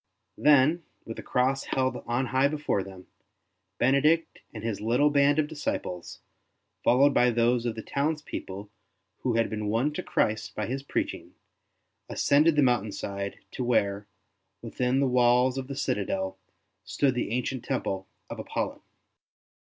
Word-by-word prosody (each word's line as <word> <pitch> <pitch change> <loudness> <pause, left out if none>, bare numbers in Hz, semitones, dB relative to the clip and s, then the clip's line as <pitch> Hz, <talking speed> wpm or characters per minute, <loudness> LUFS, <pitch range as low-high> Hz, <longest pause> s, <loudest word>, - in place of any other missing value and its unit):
Then, 150 +3 +5 0.2
with 115 - -7
the - - -5
Cross 130 +2 0
held 130 -1 +1
on 120 +3 0
high 130 +2 +2
before 145 -8 -1
them, 95 -1 -10 0.7
Benedict 145 +6 +2
and 110 -2 -8
his 110 -3 -3
Uttle 125 +7 +2
band 140 +1 +4
of 155 - +3
disciples, 145 - -4 0.6
followed 140 +4 +5
by 125 - +4
those 120 +1 +2
of 115 - -2
the 110 - -6
townspeople 140 -9 -3 0.5
who 125 -3 -1
had 115 -1 +2
been 105 -1 -4
won 120 +8 +1
to - - -3
Christ 110 0 -1
by 105 - -2
his 135 +3 -3
preaching, 140 - -4 0.7
ascended 150 +3 +3
the 150 - +4
mountain 120 -5 +2
side 100 0 -5
to 130 - -4
where, 100 -4 +1 0.6
within 125 +2 0
the 140 - +3
walls 125 0 +3
of 130 - -6
the 140 - -5
citadel, 95 -7 -2 0.4
stood 140 -3 +1
the 125 - -2
ancient 125 +2 -2
temple 95 -8 -2 0.2
of - - -7
Apollo. - - -3
125 Hz, 150 wpm, -27 LUFS, 110-140 Hz, 0.7 s, Then